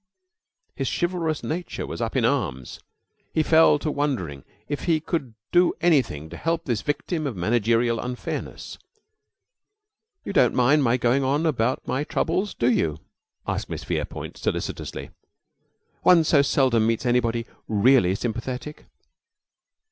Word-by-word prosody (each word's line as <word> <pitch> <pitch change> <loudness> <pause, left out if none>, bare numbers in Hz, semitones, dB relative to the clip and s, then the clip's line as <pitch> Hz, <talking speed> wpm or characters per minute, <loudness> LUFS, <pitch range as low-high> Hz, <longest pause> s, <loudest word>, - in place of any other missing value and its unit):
His - - -2
chivalrous 175 -3 -1
nature 175 +3 -4
was - - -6
up 115 +2 -2
in 125 -3 +2
arms. 90 - -2 0.6
He 155 - +3
fell 160 -1 +5
to 150 +1 -2
wondering 110 - -2 0.2
if 145 +1 -4
he 165 -3 +2
could 150 -7 -3 0.2
do 175 0 +4
anything 130 - +1
to 85 - -7
help 165 +1 -1
this 120 -5 -1
victim 155 +2 -2
of 130 - -4
managerial 115 +4 +1
unfairness. 125 0 -5 1.5
"You - - -4
don't 125 - +4
mind 140 +4 +4
my 125 0 +3
going 125 +3 +2
on 145 +5 +1
about 130 -5 0
my 135 - -1
troubles, 190 +5 -1
do 120 +1 +2
you?" 80 -9 0 0.5
asked - - -2
Miss - - -5
Verepoint, - - -4
solicitously. - - -4 0.9
"One 175 -3 +6
so 150 -2 +4
seldom 130 -5 +2
meets 115 +2 0
anybody 120 -1 +1 0.2
really 105 -3 +4
sympathetic." 125 +6 -5
130 Hz, 135 wpm, -24 LUFS, 115-155 Hz, 1.5 s, One